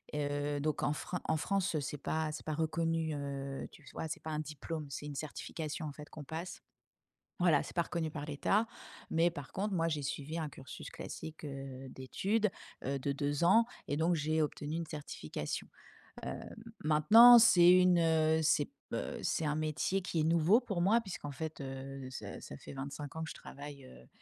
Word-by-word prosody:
heu, 145 0 -1
donc 150 0 -1
en 145 - +2
fran 180 +3 -4
en 160 - +1
France, 185 -1 0
c'est 145 +1 -4
pas 155 +1 -1
c'est 150 - -7
pas 155 - -1
reconnu, 160 0 0
heu, 140 -1 -4
tu 150 - -16
vois? 160 - -3
C'est 155 - -4
pas 160 - -5
un 150 - -1
diplôme, 155 +1 -5
c'est 145 - -6
une 145 - -6
certification, 155 +2 -4
en - - -4
fait, 150 +1 -11
qu'on 155 - -9
passe 165 +5 -6 0.8
voilà, 170 -5 +5
c'est - - -10
pas 170 - +3
reconnu 165 -2 -2
par 145 -1 -5
l'état 155 +9 +2 0.5
mais 165 +2 +4
par 145 -4 -8
contre, 200 +2 -2
moi, 165 -1 +2
j'ai 150 -2 -1
suivi 145 +4 -3
un 155 -2 -2
cursus 135 -1 -9
classique, 160 0 -8
heu, 135 -2 -6
d'études, 200 - 0 0.4
heu, 140 +1 0
de 140 +2 -1
2 145 +2 -1
ans 220 +7 +6 0.2
et 145 - 0
donc 165 +3 +3
j'ai 155 +1 +1
obtenu 150 0 -2
une 170 0 -2
certification. 140 - -5 0.9
Hem, - - -12
maintenant, 220 +11 +9
c'est 180 -7 +8
une, 180 -1 +6
heu, 160 -1 +3
c'est 150 -1 +4
b - - -27 0.2
heu, - - -3
c'est 160 - 0
un 150 0 +1
métier 155 +5 0
qui 175 -2 -1
est - - +2
nouveau 170 +7 +5
pour 200 -7 -2
moi 215 +6 +5
puisqu'en 180 -8 -6
fait, 155 +3 -5
heu, 135 0 -6
ça 130 - -7
ça 70 - -8
fait - - -10
25 140 +1 -6
ans 160 - -2
que - - -6
je - - -7
travaille, 140 -1 -9
heu, 65 - -15
155 Hz, 200 wpm, -34 LUFS, 145-170 Hz, 0.9 s, maintenant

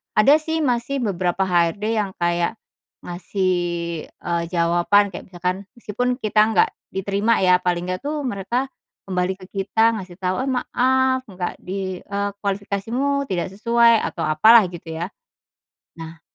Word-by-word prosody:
ada 275 +8 +6
sih 320 +1 -2
masih 250 +1 0
beberapa 180 +1 0
HRD 195 +6 +1
yang 200 -2 -2
kayak, 175 +3 0 0.5
ngasih, 185 +1 -1 0.6
eee, 170 -1 -3
jawaban 175 +4 +3
kayak - - -8
misalkan 180 +2 -2
meskipun 245 +2 -2
kita 215 -1 +1
nggak 180 - +4 0.2
diterima 200 +4 +1
ya, 180 0 +5
paling 180 0 -1
nggak 185 - -2
tuh 295 0 -3
mereka 240 +6 -2 0.4
kembali 185 +1 0
ke - - -9
kita 220 +3 +2
ngasih 185 -3 -8
tau, 185 0 0
"Oh - - -3
maaf 260 0 +1
nggak 185 -2 -5
di 190 0 -4
eee, 200 0 -2
kualifikasimu 225 +8 -1
tidak 180 -1 -2
sesuai," 235 +2 +4
atau - - -5
apalah 220 +10 +7
gitu 175 -1 -10
ya. 170 +4 -4 0.9
Nah 165 0 -9
200 Hz, 145 wpm, -22 LUFS, 180-235 Hz, 0.9 s, apalah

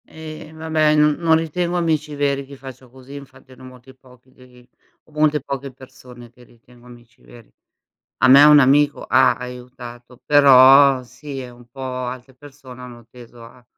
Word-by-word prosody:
E 155 -1 -12
vabbè, 155 -1 -1
no 150 0 +2
non 165 0 +1
ritengo 170 +2 -4
amici 155 -3 -3
veri 140 -1 -2
chi 140 +1 -14
faccio 130 -1 -14
così, 130 +2 -16
infatti 135 -2 -15
ne - - -20
ho - - -13
molti 130 +1 -17
pochi 130 -1 -24
di 125 -1 -22
i 125 0 -25 0.3
ho - - -28
molte 150 -1 -1
poche 140 0 -8
persone 125 -2 -17
che 125 +1 -22
ritengo 120 +1 -23
amici 120 -1 -19
veri. 120 -2 -19 0.7
A 130 - +2
me 135 +2 +7
un 150 0 +6
amico 145 +2 +1
ha 130 -2 +2
aiutato, 125 -1 -12
però 135 -1 +5
sì 140 +2 -11
e 125 -1 -10
un 120 0 -19
po' 135 - -14
altre 130 0 -8
persone 135 -2 -16
hanno 120 -2 -14
teso 120 -1 -16
a 120 +1 -19
130 Hz, 180 wpm, -18 LUFS, 125-145 Hz, 0.7 s, me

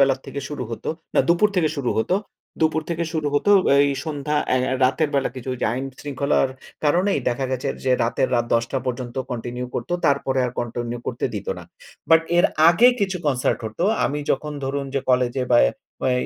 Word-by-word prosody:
বেলার 135 -1 +4
থেকে 140 - -5
শুরু 145 -4 -5
হত। 115 - -6 0.3
না - - +5
দুপুর 175 +5 +4
থেকে 160 -3 +3
শুরু 130 -4 -1
হত। 110 - -1 0.5
দুপুর 160 0 +2
থেকে 170 0 -1
শুরু 155 -2 -1
হতো 175 +8 +2 0.3
এই 140 0 +4
সন্ধ্যা 150 -1 -2 0.2
আই 130 - +3
আ - - 0
রাতের 150 +4 +2
বেলা 135 - +2
কিছু 130 0 -7
ওইযে 125 - -1
আইন 130 +3 -3 0.2
শৃঙ্খলার 140 -1 +1 0.4
কারণেই 180 +7 +2
দেখা 125 +2 -1
গেছে 130 -1 -2 0.2
যে 130 - +1
রাতের, 120 +2 0
রাত 120 - +2
১০ঃ০০ 120 +3 0
পর্যন্ত 125 0 -4
কন্টিনিউ 125 +1 -4
করত। 120 - -4 0.2
তারপরে 140 -2 +1
আর 120 - -5
কন্টিনিউ 120 0 -4
করতে - - -3
দিত - - -5
না। - - -9 0.5
বাট 165 0 +8 0.2
এর 175 - +5 0.2
আগে 190 +8 +6
কিছু 190 -2 0
কনসার্ট 130 -3 +1
হতো। 110 +11 -3 0.2
আমি 145 +1 -1
যখন 150 0 -1
ধরুন 140 +1 -2
যে, 135 - +1
কলেজে 125 0 +1
বা - - +7
এ - - -1 0.4
এ - - +3
135 Hz, 195 wpm, -22 LUFS, 125-150 Hz, 0.5 s, বাট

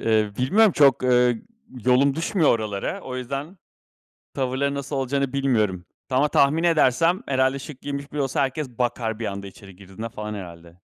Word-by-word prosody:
Eee, 110 -2 +1
bilmem, 195 - +4
çok, 140 -5 +4
ııı, 125 -1 +4 0.5
yolum 130 +2 +4
düşmüyor 165 +1 +2
oralara. 110 - -2
O 130 -7 -6
yüzden 140 +8 -5 0.8
tavırları 135 +1 -1
nasıl 140 0 -4
olacağını 135 0 -1
bilmiyorum 110 -10 0 0.3
ama 135 +4 +3
tahmin 150 +4 +3
edersem 165 +2 +3
herhâlde 130 0 +1
şık 135 -1 -10
giyinmiş 140 0 -6
biri 150 - -3
olsa 135 +2 0
herkes 135 +1 -2
bakar 115 -2 -2
bir 115 - -3
anda 100 0 -5
içeri 95 -1 -13
girdiğinde 100 +4 -8
falan 105 -1 -6
herhâlde. 85 -3 -10
130 Hz, 160 wpm, -23 LUFS, 110-140 Hz, 0.8 s, bilmem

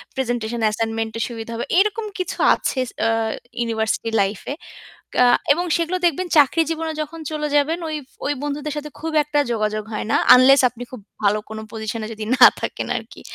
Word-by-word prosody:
Presentation 240 -3 -2
assignment 225 +1 -1
এর - - +1
সুবিধা 230 -1 -7
হবে। 235 - -3
এরকম 425 +2 +1
কিছু 365 - -3 0.2
আছে 265 - -3 0.3
আ - - +2 0.5
ইউনিভার্সিটি 225 -1 -1
লাইফ 195 +1 -1
এ। - - -7 0.6
কা 250 - +5 0.3
এবং 345 +5 -1
সেগুলো 340 +2 -1
দেখবেন 345 +2 0
চাকরি 295 +3 +5
জীবনে 325 0 -2
যখন 315 +2 -8
চলে 300 -1 -2
যাবেন 310 +4 +2
ওই, 310 - -3 0.3
ওই 290 - +1
বন্ধুদের 295 +1 -3
সাথে 300 0 -5
খুব 320 0 -4
একটা 295 0 +1
যোগাযোগ 215 -1 -1
হয় 210 - -3
না। - - +4 0.2
আনলেস 270 +2 +6
আপনি 240 0 -11
খুব 255 - -8 0.2
ভালো 205 +1 +3
কোন 220 - -6
পজিশন 220 0 -4
এ - - -6
যদি 215 0 -6
না 250 - +10
থাকেন - - -4
আরকি। - - -9
255 Hz, 185 wpm, -21 LUFS, 225-305 Hz, 0.6 s, না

